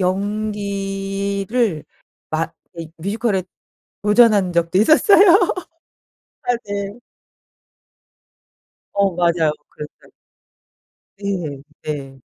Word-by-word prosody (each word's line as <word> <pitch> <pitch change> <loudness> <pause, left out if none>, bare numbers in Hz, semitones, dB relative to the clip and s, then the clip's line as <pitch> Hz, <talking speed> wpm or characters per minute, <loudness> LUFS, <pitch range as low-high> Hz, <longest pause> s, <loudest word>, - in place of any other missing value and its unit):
연기를 200 0 -1 0.5
막 165 +1 -2 0.2
이 165 -1 -7
뮤지컬에 200 +1 -1 0.6
도전한 210 -3 +4
적도 170 +2 +1
있었어요. 375 - +6 1.1
아 245 -1 +1
네. 200 +2 -4 1.9
어 200 -3 +1
맞아요. 170 -3 +2 0.2
그랬어요. 150 0 -11 1.1
네. 175 -9 -3 0.2
네. 135 -3 -6
195 Hz, 145 characters per minute, -20 LUFS, 170-210 Hz, 1.9 s, 있었어요